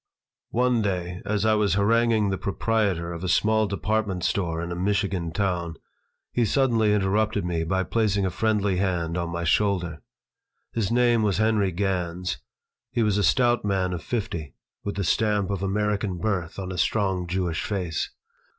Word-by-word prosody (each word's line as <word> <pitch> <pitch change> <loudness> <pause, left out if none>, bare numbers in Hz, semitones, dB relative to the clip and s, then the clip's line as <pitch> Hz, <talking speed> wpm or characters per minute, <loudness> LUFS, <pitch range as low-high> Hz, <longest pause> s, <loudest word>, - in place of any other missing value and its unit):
One 125 -1 +2
day, 90 -3 -2
as 105 0 0
I 110 - +4
was 105 -2 +2
haranguing 110 0 +3
the 95 - -1
proprietor 100 -5 0
of 85 +1 -7
a 90 - -1
small 110 +2 +3
department 100 -2 -1
store 85 -4 0
in 85 - -5
a - - -3
Michigan 95 -2 0
town, 85 -3 -1 0.6
he 120 - +1
suddenly 115 -2 +2
interrupted 105 0 +1
me 85 -2 -1
by 95 +3 0
placing 105 -2 +1
a 95 - 0
friendly 105 -3 +1
hand 90 -3 0
on 85 -1 -2
my 85 0 -3
shoulder. 90 -3 +1 0.7
His 110 -3 -1
name 120 -1 +3
was 105 -3 +1
Henry 110 -3 +2
Gans. 90 -1 -2 0.5
He 115 - +1
was 105 -1 +2
a - - +1
stout 120 0 +3
man 95 -3 0
of 85 - -4
fifty, 85 - -4 0.3
with 100 - -3
the 100 - -1
stamp 105 +1 +1
of 100 -2 -2
American 100 -1 0
birth 90 -3 -2
on 95 -1 -4
a 90 - -4
strong 95 -1 +1
Jewish 90 -2 -1
face. 90 -6 -2
100 Hz, 170 wpm, -25 LUFS, 90-110 Hz, 0.7 s, I